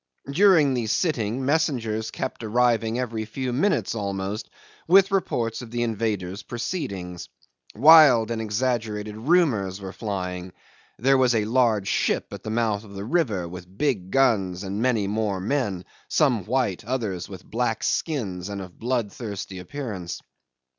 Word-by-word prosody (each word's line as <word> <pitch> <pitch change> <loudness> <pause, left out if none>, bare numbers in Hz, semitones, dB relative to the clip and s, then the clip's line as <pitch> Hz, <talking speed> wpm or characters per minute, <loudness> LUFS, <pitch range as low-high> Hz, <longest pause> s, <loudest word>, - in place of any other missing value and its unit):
During 160 -4 +5
the 120 -3 -1
sitting 125 - 0
messengers 125 -8 0
kept 115 - -5
arriving 115 0 +2
every 115 -3 -2
few 125 +3 -4
minutes 185 +11 +1
almost, 100 0 -3 0.4
with 195 +3 +6
reports 120 - -1
of 120 - -9
the 120 +1 -1
invaders' 105 -4 -2
proceedings. 100 - -5 0.5
Wild 135 -4 +7
and 115 -1 -2
exaggerated 110 -2 -2
rumours 110 - +2
were 95 -1 -7
flying: 90 -4 -4 0.4
there 135 +3 +3
was 125 -2 +3
a 105 -2 +1
large 110 -4 +2
ship - - 0
at - - -7
the - - -6
mouth 110 -2 0
of 100 -2 -12
the 100 +1 -5
river 110 - 0
with 90 +2 -11
big 110 -11 0
guns 100 -8 +2
and 100 +2 -3
many 115 -5 +2
more 105 -1 -1
men 100 -4 -1 0.2
some 125 - +2
white, 120 -6 0
others 110 -7 -3
with - - -10
black - - -1
skins 100 - -2
and 100 -1 -4
of 95 -2 -10
bloodthirsty 110 -5 -3
appearance. 100 -5 -6
110 Hz, 145 wpm, -25 LUFS, 100-130 Hz, 0.5 s, Wild